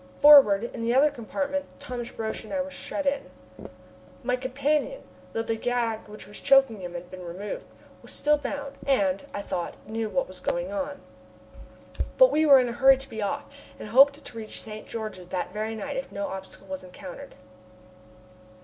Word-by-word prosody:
Forward, 275 -9 +8
in 235 - -5
the 235 +2 +1
other 290 +3 +5
compartment, 285 +3 -3
Thomas 250 -4 -6
Roch 220 -1 -3
and 220 - -11
I 285 - -1
were 280 - -8
shut 290 +1 -4
in. 275 0 0 0.9
My 250 +1 +1
companion, 280 - -1 0.3
though 225 - -1
the 225 0 -1
gag 230 -1 -1
which 210 0 -10
was 205 - -8
choking 270 -6 +5
him 175 -1 -6
had 175 +1 -7
been 185 -1 -8
removed, 180 +4 -6 0.4
was - - -9
still 300 0 +2
bound, 280 0 -5
and, 195 -8 +2
I 200 - -4
thought, 175 -3 -3
knew 220 0 -2
what 270 +5 0
was 185 -1 -9
going 175 +1 -2
on. 285 +7 -4 1.2
But - - +8
we 310 +1 +3
were 275 -2 +9
in 250 - +2
a - - -4
hurry 265 +2 +6
to 270 +1 -9
be 220 - -5
off, 285 +8 -2 0.3
and - - -8
hoped 280 +5 +6
to 230 - -9
reach 215 -1 -3
St. 215 -1 -8
George 215 -4 -5
that 180 0 -4
very 215 +1 -3
night 280 +5 -4
if 265 - -5
no 200 0 -3
obstacle 190 0 -9
was 190 -1 -6
encountered. 180 0 -10
235 Hz, 185 wpm, -27 LUFS, 205-280 Hz, 1.2 s, were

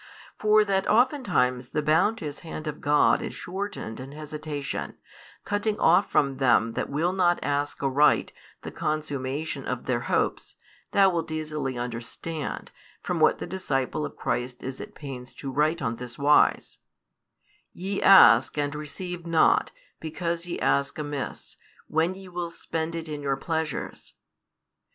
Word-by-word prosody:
For 215 0 +5
that 195 -1 0
oftentimes 215 - +2
the 150 - -1
bounteous 160 0 +1
hand 160 -1 -7
of 150 -1 -5
God 145 +1 +4
is - - -5
shortened 190 - -5
in 135 +2 -8
hesitation, 150 -1 -5 0.5
cutting 205 +1 -1
off 170 +2 +4
from 140 -2 +2
them 115 -4 +3
that - - -3
will 165 +6 0
not 175 -2 +3
ask 145 0 -1
aright 140 +2 +3 0.3
the - - -6
consummation 145 -1 -3
of 125 -1 -3
their 125 -2 0
hopes, - - 0 0.3
thou 195 -1 +5
wilt 165 -2 -2
easily 150 -4 -3
understand, 120 +6 -5 0.3
from - - -2
what - - +4
the - - -5
disciple 150 -5 -2
of - - -5
Christ 125 +1 -3
is 130 +1 -5
at - - -10
pains 130 -4 -8
to 135 - -6
write 155 +3 +1
on 115 -1 -1
this 125 0 -8
wise: 145 +1 +3 0.9
Ye 195 +2 -4
ask, 130 - +7
and 145 -1 0
receive 170 +4 -6
not, 170 - +3 0.3
because 170 +2 -3
ye 175 - -3
ask 140 0 +1
amiss, 145 -2 -5 0.3
when 165 +4 +1
ye 190 0 -11
will 175 -1 -4
spend 165 0 -4
it 165 -1 -5
in 150 -1 -5
your 140 -1 -1
pleasures. 160 0 -4
150 Hz, 145 wpm, -26 LUFS, 135-175 Hz, 0.9 s, ask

